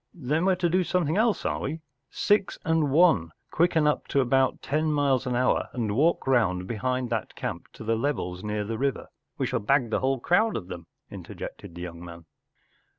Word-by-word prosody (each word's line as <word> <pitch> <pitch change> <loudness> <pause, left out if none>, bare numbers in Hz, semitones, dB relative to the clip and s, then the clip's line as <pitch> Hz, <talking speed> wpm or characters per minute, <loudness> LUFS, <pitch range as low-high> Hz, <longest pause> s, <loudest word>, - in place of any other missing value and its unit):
Then 155 +2 -1
we 190 - +4
Ye - - -3
to 175 -1 +1
do 180 +2 +2
something 175 -3 0
else, 220 +1 +1
are - - -1
we? 160 - -4 0.3
Six 205 -2 +1
and 160 -2 +2
One, 140 - +4 0.2
quicken 165 -2 +2
up 150 - +1
to 140 - +1
about 130 0 +2
ten 155 +2 0
miles 140 -3 +1
an 125 - -1
hour 125 +1 +1
and 110 -5 -2
walk 160 +7 +2
round 95 -9 +2
behind 125 +3 -2
that 110 -3 -3
camp - - -5
to - - -10
the 115 +1 +1
levels 110 -8 -2
near 105 0 -2
the 110 +2 -4
river 135 0 -2
— - - -55
we - - 0
shall - - -1
bag 125 +1 +1
the - - +1
whole 135 0 0
crowd 215 - +2
of 95 -4 -8
them,” 85 -2 -8 0.2
interjected 85 - -9
the 85 - -6
young 85 -1 -8
man. 85 -1 -11
135 Hz, 210 wpm, -26 LUFS, 110-160 Hz, 0.3 s, we